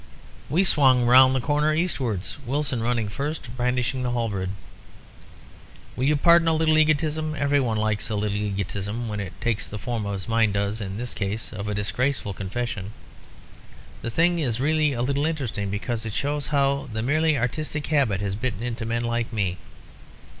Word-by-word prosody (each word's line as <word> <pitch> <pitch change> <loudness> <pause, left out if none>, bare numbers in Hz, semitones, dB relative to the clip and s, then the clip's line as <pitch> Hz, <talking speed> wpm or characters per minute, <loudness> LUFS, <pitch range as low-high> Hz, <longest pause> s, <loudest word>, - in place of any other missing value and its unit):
"We 175 +6 +3
swung 130 -8 +4
round 130 +2 +7
the - - +2
corner 150 +3 +1
eastwards, 130 - -1
Wilson 135 -1 -1
running 115 -2 0
first, 140 +1 -5
brandishing 125 +1 0
the 125 - -1
halberd 105 -6 -1 1.5
"Will 130 - -1
you 150 +2 +4
pardon 170 +2 +5
a 160 - +4
little 155 0 +3
egotism? 155 0 +1
Every 145 0 +2
one 115 -5 0
likes 110 0 0
a 110 - -1
little 105 0 -1
egotism, 100 +2 -3
when 105 -1 -3
it 100 -3 -6
takes 115 -3 0
the 105 - -6
form, 115 -2 -3
as 100 -2 -4
mine 115 -2 +2
does 100 +2 -1
in 95 -1 -5
this 120 +1 -3
case, 105 +3 -3
of 105 -1 -5
a 105 - -2
disgraceful 105 +3 -1
confession. 105 +1 -4 1.1
The - - -3
thing 170 +7 +3
is 125 -7 0
really 155 +1 +2
a 120 -1 -1
little 140 +3 +1
interesting, 125 -11 -2
because 110 +3 -3
it 110 -2 -5
shows 145 +3 -1
how 140 -1 +1
the 110 0 -3
merely 155 +3 +2
artistic 150 +5 -2
habit 130 -11 +1
has 100 -1 -1
bitten 115 -1 -3
into 115 -2 -3
men 115 +1 -1
like 120 0 -1
me. 95 -5 -1
120 Hz, 175 wpm, -24 LUFS, 105-145 Hz, 1.5 s, round